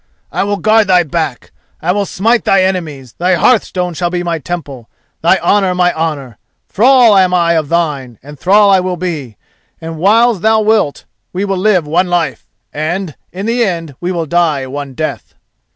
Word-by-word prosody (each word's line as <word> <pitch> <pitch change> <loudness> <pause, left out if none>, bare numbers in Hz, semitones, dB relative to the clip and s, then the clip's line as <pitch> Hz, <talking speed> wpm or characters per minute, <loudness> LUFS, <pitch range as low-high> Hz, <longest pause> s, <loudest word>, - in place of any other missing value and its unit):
I - - -1
will 205 0 -1
guard 215 0 +3
thy 180 -2 +4
back, 155 -4 -4 0.3
I 175 - 0
will 200 +1 -1
smite 225 +7 +1
thy 195 -1 +3
enemies, 155 -9 -3
thy 180 +1 +2
hearthstone 180 -3 +1
shall 175 +2 -2
be 175 0 -3
my 170 -2 -2
temple, 140 -6 -7 0.3
thy 170 +4 +3
honour 195 -3 +1
my 180 -1 +2
honour. 145 -8 -4 0.3
Thrall 245 -1 +4
am 185 -2 +3
I 170 -1 +2
of 155 -3 -1
thine, 145 -8 -2
and 145 0 -12
thrall 200 +2 +4
I 190 - +5
will 180 -1 -3
be, 155 - -5 0.4
and 160 -1 -7
whiles 220 +2 +3
thou 220 +1 +3
wilt 215 -9 0 0.3
we 190 +3 -2
will 195 -1 -1
live 185 -4 +2
one 175 +5 +1
life, 175 -2 -2 0.3
and, 160 +1 -3 0.2
in 190 +3 -6
the 235 +2 +1
end, 165 -7 -3
we 175 +1 -2
will 170 -3 -2
die 160 -4 0
one 140 0 -7
death." 155 +2 -5
175 Hz, 185 wpm, -14 LUFS, 155-195 Hz, 0.4 s, I